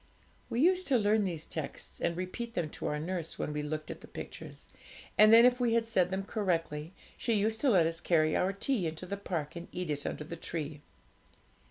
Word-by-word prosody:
We 235 - -1
used 370 +3 +4
to 265 - +4
learn 210 -1 +3
these 165 -4 -2
texts, 155 -3 -5
and 170 0 0
repeat 230 +6 -5
them 160 -4 -1
to - - -4
our 150 - -1
nurse 170 +1 -3
when 150 - -3
we 150 - -2
looked 155 +1 -4
at - - -9
the - - -12
pictures; - - -9 0.5
and 215 +1 +7
then, 230 +1 +9
if 250 0 +4
we 235 -2 +2
had 230 -1 +2
said 190 -6 +2
them 190 +1 -2
correctly, 165 -6 -2 0.3
she 235 - 0
used 220 +1 +2
to 280 - +4
let 185 -8 +5
us 165 0 -2
carry 155 -3 +2
our 185 +1 +2
tea 200 -1 0
into 160 +3 -5
the 200 - -3
park 170 -7 -4
and 170 0 -7
eat 180 -3 -3
it 145 -1 -2
under - - -4
the 170 +3 -7
tree. 155 -3 -5
180 Hz, 220 wpm, -31 LUFS, 160-220 Hz, 0.5 s, then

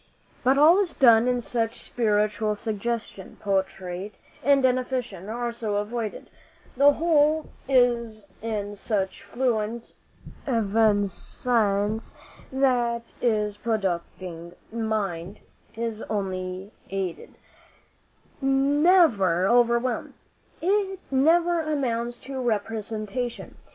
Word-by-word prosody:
But 265 +2 +4
all 320 +6 +7
is 375 -6 0
done 235 -2 +6
in 250 -1 +1
such 230 -1 -2
spiritual 210 -1 0
suggestion, 220 -1 -4
portrait 190 0 -2 0.3
and 275 +1 +4
definition 250 -6 -1
are 240 +1 -2
so 225 -3 -3
avoided, 215 +1 -4 0.4
the 285 +2 +6
whole 310 -1 +2 0.2
is 235 -5 +2
in 210 -2 -3
such 195 -2 -2
fluent 235 -2 -2 0.5
evanescence, 215 -1 +1 0.4
that 240 -3 0
the 210 -4 +1
producing 180 -5 -3 0.2
mind 205 -5 -3 0.3
is 225 -1 -3
only 190 -1 -3 0.2
aided, 190 -3 -4 1.1
never 270 - +4
overwhelmed. 240 +2 +2 0.5
It 390 +1 +1
never 335 +5 +3
amounts 240 -6 -2
to 265 -1 -4
representation. 225 +1 -3
230 Hz, 90 wpm, -25 LUFS, 205-255 Hz, 1.1 s, all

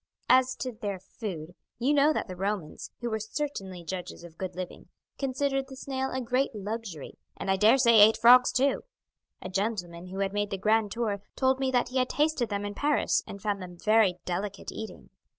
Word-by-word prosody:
As 255 0 +5
to 255 - -4
their 205 -3 -4
food, 180 -4 -7 0.2
you 260 +5 +2
know 290 +1 +5
that 305 - -2
the 185 - -7
Romans, 195 -3 -3
who 240 - -2
were 220 - -1
certainly 205 - -4
judges 180 0 -6
of 170 -2 -12
good 185 0 -5
living, 185 -1 -7 0.3
considered 270 0 -1
the 265 - -10
snail 265 0 -3
a 260 - -2
great 250 0 0
luxury, 205 -6 -6 0.2
and 195 - -1
I - - +4
dare 215 +7 +5
say 235 -4 +6
ate 215 +2 +7
frogs 250 +2 +7
too. 275 +2 +2 0.6
A - - -5
gentleman 185 -3 -3
who 190 +1 -7
had 195 0 -1
made 205 0 0
the 195 - -3
grand 215 +1 +2
tour 215 -4 -2
told 265 0 +2
me 265 -1 +1
that 245 -1 +1
he 260 +1 0
had 255 - +1
tasted 295 -6 +1
them 205 -1 -2
in 205 - -4
Paris 290 +7 +1
and 200 -1 -9
found 205 -2 -1
them 180 -1 -9
very 215 -2 +3
delicate 195 +2 -4
eating. 220 - -8
215 Hz, 205 wpm, -28 LUFS, 190-255 Hz, 0.6 s, ate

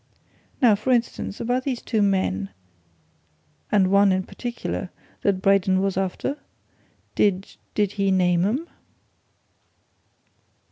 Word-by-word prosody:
Now, 235 -3 +7
for 210 +6 -2
instance, 235 -4 -1
about 250 +2 -1
these 260 -3 -2
two 220 -3 -1
men 190 - 0 1.2
and 190 -3 +3
one 200 0 +5
in 185 0 +1
particular 240 -4 -5 0.3
that 195 -1 0
Braden 195 -1 +3
was 195 0 0
after? 195 +9 -2 0.7
Did 195 -1 0 0.2
did 205 -2 +1
he 200 -1 0
name 180 -2 +3
'em?" 255 - -1
195 Hz, 110 wpm, -23 LUFS, 185-230 Hz, 1.2 s, Now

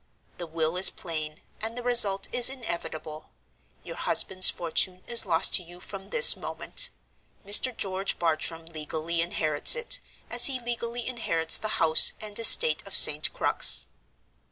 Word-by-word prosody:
The 175 - -9
will 160 +1 -5
is 185 - +5
plain, 155 -3 -9 0.2
and 225 +2 -8
the 245 - -9
result 210 -6 0
is 245 0 +4
inevitable. 170 - -10 0.5
Your - - -12
husband's 185 -1 +3
fortune 180 +2 -5
is 235 -3 +2
lost 165 -2 0
to - - +2
you 175 +1 -16
from 195 +1 -13
this 480 0 +6
moment. - - -1 0.6
Mr. 220 +4 +1
George 195 0 -5
Bartram 165 0 -4
legally 160 +1 -6
inherits 155 - +1
it, 480 -1 -4 0.3
as - - -2
he 265 -2 -6
legally 235 0 -8
inherits 165 -10 -1
the 215 - -8
house 160 -1 +3
and 210 0 -8
estate 160 -8 +4
of 195 - -8
St. 150 0 +6
Crux. - - +3
185 Hz, 150 wpm, -23 LUFS, 160-230 Hz, 0.6 s, this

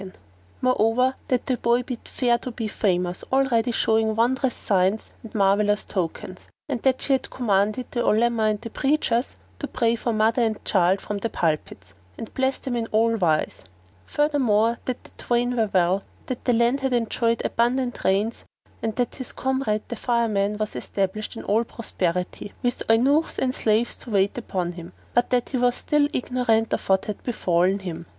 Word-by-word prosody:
[FN#454] 190 -1 -9 0.5
Moreover, 255 +1 +2
that 250 -2 0
the 255 - 0
boy 235 +1 +2
bid 250 -2 -7
fair 240 -2 +1
to 255 - -6
be 230 -2 -4
famous, 180 -4 -1
already 255 -3 +2
showing 220 -1 +2
wondrous 250 +3 +1
signs 195 +2 0
and 225 - -12
marvellous 205 +1 +2
tokens; 185 0 -4 0.2
and 265 -6 -3
that 260 -1 +1
she 275 - +2
had 265 - 0
commanded 215 0 +1
the 240 - -2
Olema 225 +1 +2
and 210 -1 -1
the 230 -1 -7
preachers 265 -3 0 0.2
to - - -3
pray 230 -1 +1
for 235 +1 -2
mother 220 +2 +2
and 220 -2 -1
child 185 0 +3
from 205 -1 -4
the 230 - -2
pulpits 150 - -2 0.2
and 225 - -8
bless 265 0 0
them 255 -2 -4
in 230 -1 -1
all 225 +1 +2
wise; 165 -7 0 0.4
furthermore 240 -7 +2
that 255 -1 -3
the - - -17
twain 245 +1 0
were 220 -3 +1
well, 185 0 +2 0.2
that 255 - -5
the 245 - +3
land 235 +4 +3
had 265 -1 -1
enjoyed 230 0 0
abundant 245 +1 0
rains, 205 +4 +1 0.4
and 220 -1 -2
that 245 -2 -1
his 260 - -5
comrade 260 -5 -1
the 235 - -3
Fireman 215 -4 0
was 215 0 -3
established 200 +3 -3
in - - -7
all 220 +3 +2
prosperity, 185 -4 -3
with 245 0 0
eunuchs 275 +8 +3
and 255 -1 0
slaves 225 +1 +1
to - - -10
wait 200 -1 +2
upon 185 -7 -3
him; 175 0 -10 0.2
but 240 0 +2
that 245 -1 +1
he 265 - -1
was 245 0 +2
still 295 +2 +2
ignorant 235 -3 +1
of - - -3
what 190 0 +3
had 210 - -5
befallen 185 -5 +1
him. 170 -4 -7
225 Hz, 180 wpm, -24 LUFS, 205-245 Hz, 0.5 s, child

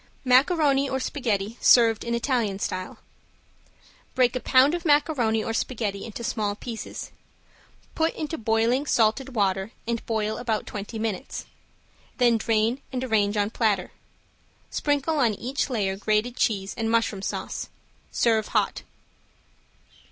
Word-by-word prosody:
~MACARONI 275 +1 +4
OR 265 - -1
SPAGHETTI 225 -5 -2
SERVED 230 -3 +5
IN 235 0 -1
ITALIAN 235 -5 0
STYLE~ 185 -2 -4 1.2
Break 250 -1 +3
a - - 0
pound 265 +4 +4
of 345 -1 -2
macaroni 290 -8 +2
or 225 - -3
spaghetti 215 -5 -2
into 230 +1 -7
small 215 -4 -1
pieces. 225 +1 -7 0.8
Put 320 0 0
into 315 +1 -4
boiling 230 +5 +1
salted 245 +3 +1
water 195 0 0
and 235 -1 -2
boil 220 -1 -1
about 225 -3 -1
twenty 210 +2 -6
minutes. 220 -4 -4 0.7
Then 240 -2 +4
drain 225 +4 +1
and 255 -1 -3
arrange 215 -4 +1
on 205 +1 +1
platter. 210 -6 0 0.8
Sprinkle 290 +1 0
on 230 -5 +2
each 260 +7 -2
layer 200 -6 -1
grated 215 +4 0
cheese 195 -5 0
and 225 -1 -2
mushroom 225 -3 +1
sauce. - - -4 0.4
Serve 220 -2 +2
hot. - - 0
230 Hz, 130 wpm, -25 LUFS, 215-260 Hz, 1.2 s, SERVED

